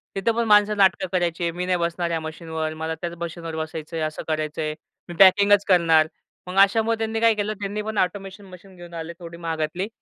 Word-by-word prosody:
तिथे 195 Hz, +4 st, +1 dB
पण 235 Hz, +1 st, 0 dB
माणसं 210 Hz, 0 st, +4 dB
नाटकं 190 Hz, -2 st, +3 dB
करायची. 175 Hz, -1 st, 0 dB
मी 180 Hz, +2 st, -4 dB
नाही 180 Hz, 0 st, +1 dB
बसणार 170 Hz, 0 st, -2 dB
ह्या 165 Hz, -, -1 dB
मशीनवर, 160 Hz, 0 st, -5 dB
मला 160 Hz, +1 st, -4 dB
त्याच 170 Hz, -1 st, -4 dB
मशीनवर 165 Hz, -1 st, -5 dB
बसायचंय, 160 Hz, 0 st, -5 dB
असं 155 Hz, -, -7 dB
करायचंय. 155 Hz, 0 st, -2 dB, 0.4 s
मी 175 Hz, -, -7 dB
पॅकिंगच 200 Hz, +1 st, +6 dB
करणार. 165 Hz, -4 st, +4 dB, 0.4 s
मग 185 Hz, -, -6 dB
अशामुळं 225 Hz, +3 st, +4 dB
त्यांनी 225 Hz, 0 st, -2 dB
काय 230 Hz, 0 st, +4 dB
केलं 210 Hz, +1 st, -2 dB
त्यांनी 205 Hz, +1 st, -3 dB
पण 215 Hz, 0 st, -5 dB
ऑटोमेशन 195 Hz, +1 st, -2 dB
मशीन 185 Hz, +1 st, -14 dB
घेऊन 175 Hz, -1 st, -12 dB
आले 165 Hz, 0 st, -6 dB
थोडी 170 Hz, -1 st, -9 dB
महागातली 165 Hz, +3 st, -3 dB
175 Hz, 190 wpm, -23 LUFS, 160-200 Hz, 0.4 s, पॅकिंगच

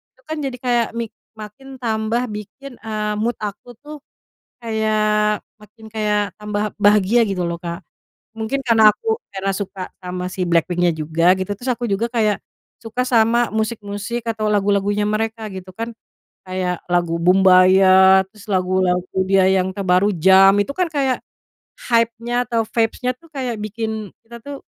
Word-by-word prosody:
itu -, -, -28 dB
kan 315 Hz, -, -4 dB
jadi 265 Hz, -2 st, -4 dB
kayak 240 Hz, -2 st, +1 dB
mik 230 Hz, -2 st, -3 dB, 0.3 s
makin 260 Hz, +6 st, -10 dB
tambah 225 Hz, +1 st, -1 dB
bikin, 215 Hz, +6 st, -9 dB
eee, 215 Hz, -1 st, -3 dB
mood 230 Hz, +2 st, -1 dB
aku 210 Hz, +4 st, -6 dB
tuh 300 Hz, +1 st, -9 dB, 0.7 s
kayak 215 Hz, -1 st, +1 dB, 0.2 s
makin 215 Hz, +2 st, -17 dB
kayak 210 Hz, -2 st, 0 dB
tambah 210 Hz, 0 st, -2 dB
bahagia 210 Hz, +3 st, +4 dB
gitu 185 Hz, -3 st, -2 dB
loh, 170 Hz, 0 st, -3 dB
Kak. 170 Hz, +1 st, -6 dB, 0.5 s
Mungkin 225 Hz, +5 st, -2 dB
karena 220 Hz, -2 st, +6 dB
aku 445 Hz, -, -3 dB
karena 195 Hz, 0 st, -2 dB
suka 195 Hz, -2 st, -6 dB
sama 180 Hz, 0 st, -5 dB
si 185 Hz, -1 st, -2 dB
BLACKPINK-nya 175 Hz, +1 st, +2 dB
juga 160 Hz, +3 st, +2 dB
gitu, 190 Hz, +2 st, -3 dB
terus 245 Hz, +5 st, -5 dB
aku 240 Hz, 0 st, -3 dB
juga 200 Hz, +4 st, 0 dB
kayak 215 Hz, -4 st, +1 dB, 0.4 s
suka 230 Hz, +2 st, -2 dB
sama 235 Hz, 0 st, +3 dB
musik-musik 220 Hz, +1 st, -3 dB
atau 220 Hz, -1 st, -1 dB
lagu-lagunya 205 Hz, 0 st, +1 dB
mereka 220 Hz, +1 st, -2 dB
gitu 185 Hz, -1 st, -9 dB
kan. 230 Hz, +2 st, -4 dB, 0.6 s
Kayak 185 Hz, -1 st, -3 dB
lagu 175 Hz, -1 st, +1 dB
Boombayah, 190 Hz, +1 st, +6 dB
terus 210 Hz, -2 st, -15 dB
lagu-lagu 185 Hz, -1 st, 0 dB
dia 195 Hz, -1 st, +4 dB
yang 190 Hz, 0 st, +1 dB
terbaru 190 Hz, +1 st, +2 dB
Jump 190 Hz, +3 st, +6 dB
itu 280 Hz, -, -6 dB
kan 365 Hz, -2 st, +1 dB
kayak, 270 Hz, -3 st, 0 dB, 0.7 s
hype-nya 235 Hz, +1 st, +1 dB
atau 230 Hz, -2 st, 0 dB
vibes-nya 235 Hz, +2 st, 0 dB
tuh 330 Hz, +6 st, -21 dB
kayak 260 Hz, -5 st, -3 dB
bikin 220 Hz, -1 st, -4 dB, 0.2 s
kita 235 Hz, +1 st, -10 dB
tuh 285 Hz, -1 st, -8 dB
210 Hz, 150 wpm, -20 LUFS, 190-230 Hz, 0.7 s, karena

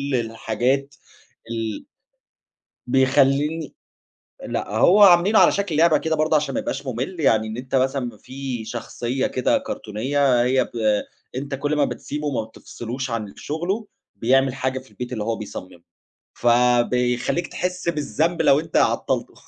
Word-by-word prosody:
الحاجات 120 Hz, +4 st, -1 dB, 0.6 s
ال 115 Hz, -2 st, -4 dB, 1.0 s
بيخلّيني 135 Hz, +4 st, +2 dB, 0.7 s
لأ -, -, -3 dB
هُو 205 Hz, +3 st, +6 dB
عاملينه 185 Hz, +3 st, +6 dB
على -, -, +6 dB
شكل 195 Hz, -6 st, -1 dB
لعبة 160 Hz, -1 st, +5 dB
كده 160 Hz, 0 st, -1 dB
برضو 155 Hz, 0 st, +1 dB
عشان 150 Hz, 0 st, +1 dB
ما 275 Hz, -, 0 dB
يبقاش 280 Hz, -, -4 dB
مُمل. 130 Hz, +9 st, -4 dB
يعني 110 Hz, -7 st, +3 dB
إن 110 Hz, +1 st, -6 dB
أنت 130 Hz, +1 st, -4 dB
مثلًا 130 Hz, 0 st, +1 dB
م 120 Hz, -3 st, -7 dB
في 130 Hz, -2 st, -6 dB
شخصيّة 120 Hz, +3 st, -3 dB
كده 130 Hz, -, +1 dB
كرتونية 135 Hz, -, 0 dB
هي 130 Hz, +1 st, +2 dB
ب -, -, -16 dB, 0.7 s
أنت 140 Hz, +1 st, -3 dB
كل 145 Hz, +2 st, -1 dB
ما 145 Hz, -1 st, +3 dB
بتسيبه 150 Hz, +1 st, -5 dB
وما 130 Hz, -6 st, -1 dB
بتفصلوش 120 Hz, +3 st, -7 dB
عن 110 Hz, -3 st, -4 dB
شغله 185 Hz, +8 st, -3 dB, 0.3 s
بيعمل 135 Hz, +2 st, +2 dB
حاجة 130 Hz, 0 st, -2 dB
في 130 Hz, -, -18 dB
البيت 125 Hz, 0 st, -6 dB
اللي 110 Hz, -, -3 dB
هُو 115 Hz, +1 st, -1 dB
بيصممه 95 Hz, -4 st, -9 dB, 0.5 s
فبيخليك 125 Hz, +5 st, +2 dB
تحس 180 Hz, -1 st, -3 dB
بالذنب 160 Hz, +2 st, 0 dB
لو 140 Hz, -, +5 dB
أنت 160 Hz, -, -5 dB
عطلته -, -, +1 dB
135 Hz, 145 wpm, -22 LUFS, 120-155 Hz, 1.0 s, هُو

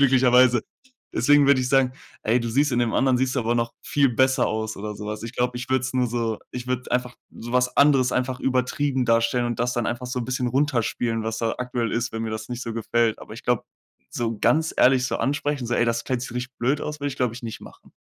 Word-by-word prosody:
glücklicherweise. 125 Hz, -2 st, +5 dB, 0.5 s
Deswegen 145 Hz, +3 st, +4 dB
würde 140 Hz, -2 st, +5 dB
ich 125 Hz, -, -1 dB
sagen: 130 Hz, -1 st, +3 dB, 0.3 s
„Ey, 115 Hz, +3 st, +2 dB
du 115 Hz, -, -3 dB
siehst 140 Hz, +4 st, +2 dB
in 120 Hz, -, +1 dB
dem 115 Hz, -2 st, 0 dB
anderen, 130 Hz, -1 st, +3 dB
siehst 130 Hz, +1 st, 0 dB
du 130 Hz, -, +2 dB
aber 115 Hz, +1 st, 0 dB
noch 120 Hz, 0 st, -1 dB
viel 140 Hz, -2 st, +2 dB
besser 130 Hz, +2 st, +2 dB
aus“, 110 Hz, 0 st, -3 dB
oder 105 Hz, +1 st, -5 dB
so 105 Hz, -, -7 dB
was. 105 Hz, 0 st, -5 dB
Ich 115 Hz, +2 st, -7 dB
glaube, 125 Hz, 0 st, -1 dB
ich 125 Hz, -, -6 dB
würde 130 Hz, -1 st, +2 dB
es 130 Hz, 0 st, -3 dB
nur 125 Hz, -1 st, +2 dB
so 115 Hz, -2 st, -2 dB
ich 125 Hz, 0 st, -6 dB
würde 125 Hz, 0 st, 0 dB
es -, -, -8 dB
einfach 125 Hz, 0 st, -1 dB, 0.2 s
so 120 Hz, +1 st, -7 dB
was 125 Hz, 0 st, +1 dB
anderes 140 Hz, -3 st, +4 dB
einfach 130 Hz, 0 st, -1 dB
übertrieben 130 Hz, +1 st, 0 dB
darstellen 115 Hz, +1 st, +2 dB
und 120 Hz, -, -3 dB
das 125 Hz, 0 st, 0 dB
dann 120 Hz, -1 st, -1 dB
einfach 120 Hz, +1 st, -3 dB
so 125 Hz, 0 st, -3 dB
'n -, -, -3 dB
bisschen 125 Hz, -1 st, -1 dB
runterspielen, 120 Hz, -4 st, 0 dB
was 110 Hz, 0 st, -2 dB
da 115 Hz, -1 st, -1 dB
aktuell 125 Hz, -2 st, -2 dB
ist, 120 Hz, 0 st, -1 dB
wenn 115 Hz, -, -3 dB
mir 110 Hz, -, -3 dB
das 110 Hz, +1 st, -5 dB
nicht 125 Hz, 0 st, -5 dB
so 115 Hz, -, -4 dB
gefällt. 115 Hz, 0 st, 0 dB
Aber 110 Hz, -, -10 dB
ich 115 Hz, -, -10 dB
glaube, 125 Hz, -2 st, +1 dB, 0.5 s
so 115 Hz, -1 st, -2 dB
ganz 160 Hz, +7 st, +2 dB
ehrlich 130 Hz, -1 st, +4 dB
so -, -, -2 dB
ansprechen, 145 Hz, -2 st, -1 dB
so: 120 Hz, -, -1 dB
„Ey, 120 Hz, -, +3 dB
das 115 Hz, 0 st, -1 dB
Kleid 125 Hz, -2 st, -2 dB
sich 125 Hz, -, -6 dB
richtig 125 Hz, +1 st, -5 dB
blöd 135 Hz, +5 st, +1 dB
aus“, 150 Hz, 0 st, -5 dB
würde 145 Hz, -, -1 dB
ich, 135 Hz, -, -7 dB
glaube 125 Hz, -4 st, 0 dB
ich, 125 Hz, -, -10 dB
nicht 115 Hz, -2 st, -6 dB
machen. -, -, -15 dB
125 Hz, 260 wpm, -24 LUFS, 115-130 Hz, 0.5 s, glücklicherweise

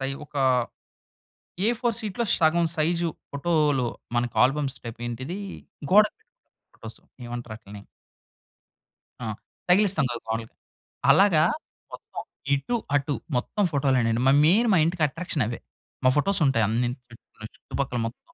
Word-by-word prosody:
పై 135 Hz, 0 st, -2 dB, 0.2 s
ఒకా 145 Hz, -1 st, -2 dB, 1.3 s
ఎ -, -, +4 dB
ఫోర్ 235 Hz, -2 st, +1 dB
షీట్‌లో 220 Hz, +2 st, -2 dB
సగం 170 Hz, +1 st, +3 dB
సైజు 170 Hz, +2 st, +1 dB, 0.2 s
ఫోటోలు, 145 Hz, -4 st, +1 dB, 0.3 s
మనకు 120 Hz, -1 st, -1 dB
ఆల్బమ్స్ 135 Hz, 0 st, -1 dB
టైపేంటిదీ? 120 Hz, -, -5 dB, 0.5 s
గోడకు 210 Hz, +2 st, +6 dB
పెట్టుకునే -, -, -42 dB, 0.2 s
ఫోటోస్, -, -, -11 dB, 0.3 s
ఏమంటారాటిలిని? 110 Hz, -4 st, -8 dB, 1.4 s
ఆ! -, -, -3 dB, 0.4 s
తగిలిస్తాం 185 Hz, -4 st, +4 dB
కదా! 120 Hz, -1 st, -4 dB
గోడలకి. 115 Hz, 0 st, -4 dB, 0.6 s
అలాగా 185 Hz, -6 st, +5 dB, 0.5 s
మొత్తం -, -, -8 dB, 0.3 s
ఇటు 230 Hz, -, -2 dB, 0.2 s
అటు 145 Hz, +1 st, +1 dB, 0.2 s
మొత్తం 205 Hz, +11 st, -1 dB
ఫోటోలెనండి. 130 Hz, -5 st, +1 dB
మరి 135 Hz, +1 st, +6 dB
మెయిన్ 215 Hz, +9 st, +4 dB
మా -, -, +5 dB
ఇంటికి 170 Hz, -1 st, 0 dB
అట్రాక్షన్ 155 Hz, -3 st, -2 dB
అవే. 115 Hz, -, -5 dB, 0.4 s
మా 130 Hz, -, +6 dB
ఫోటోస్ 190 Hz, +4 st, +2 dB
ఉంటాయి 120 Hz, -4 st, +2 dB
అన్ని 120 Hz, +2 st, 0 dB, 0.2 s
చుట్టూ 115 Hz, -2 st, -14 dB
చుట్టుపక్కల 130 Hz, -3 st, -4 dB
మొత్తం. 115 Hz, -, -10 dB
140 Hz, 125 wpm, -25 LUFS, 120-175 Hz, 1.4 s, గోడకు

